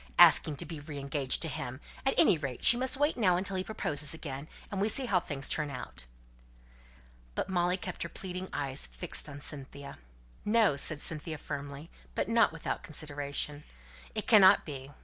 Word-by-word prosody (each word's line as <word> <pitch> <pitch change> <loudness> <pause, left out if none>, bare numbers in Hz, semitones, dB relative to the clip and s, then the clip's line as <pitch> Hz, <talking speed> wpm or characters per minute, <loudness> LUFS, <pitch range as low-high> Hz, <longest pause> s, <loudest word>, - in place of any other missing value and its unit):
Asking 165 -3 +7
to 155 - -4
be 160 -1 -7
re 145 0 -8
engaged 140 0 0
to - - -2
him! 130 -3 -5 0.3
At 270 - +2
any 310 - +6
rate, 140 -5 -5
she - - +9
must 260 +2 +2
wait 290 +1 +1
now 185 -7 +3
until 195 +1 -3
he 185 - -1
proposes 150 -7 0
again, 145 -2 -7 0.2
and 195 -2 -2
we 210 - +2
see 270 +3 +1
how 195 -6 +2
things 140 -5 -3
turn 150 -1 -1
out." 65 - -6 1.3
But - - -2
Molly 180 0 +1
kept - - -7
her - - -3
pleading 185 0 -6
eyes 140 -1 0
fixed 175 -3 -3
on 145 0 -8
Cynthia. 140 -1 -6 0.4
"No!" 215 -7 +3
said 150 +2 -1
Cynthia 155 0 -3
firmly, 145 +1 -7 0.2
but - - 0
not 230 +1 +4
without 165 -1 -4
consideration. 145 -1 -3 0.5
"It - - -1
cannot 200 -2 +7
be. 135 -3 -7
155 Hz, 180 wpm, -31 LUFS, 140-185 Hz, 1.3 s, she